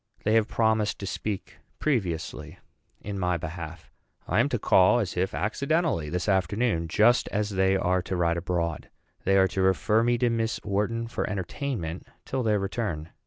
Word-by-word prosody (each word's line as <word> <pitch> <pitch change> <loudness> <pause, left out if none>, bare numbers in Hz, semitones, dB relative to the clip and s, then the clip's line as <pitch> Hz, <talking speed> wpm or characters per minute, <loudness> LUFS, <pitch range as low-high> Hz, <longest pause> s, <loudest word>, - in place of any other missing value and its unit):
They 110 - +2
have 110 -1 +4
promised 110 -2 +1
to 100 - -6
speak 100 0 -5 0.2
previously 85 - -2 0.4
in 100 -1 -5
my 90 -1 +1
behalf. 80 0 -7 0.4
I - - +2
am - - +3
to - - 0
call, 95 +6 +5
as 105 -6 -2
if 90 +1 -1
accidentally, 140 - 0
this 90 +3 -2
afternoon 95 -1 +1
just 110 +8 +4
as 105 0 -1
they 95 0 +2
are 90 -1 +1
to 95 - -4
ride 85 -1 +1
abroad. 85 -2 -2 0.4
They 95 +1 +4
are 95 0 +5
to 95 - -2
refer 95 +4 +3
me 120 +1 +2
to 120 0 +2
Miss 115 0 -1
Wharton 105 +3 -1
for 115 - -3
entertainment 95 - -4 0.2
till 130 - -2
their 110 -3 +2
return. 95 -6 -3
95 Hz, 170 wpm, -27 LUFS, 90-115 Hz, 0.4 s, call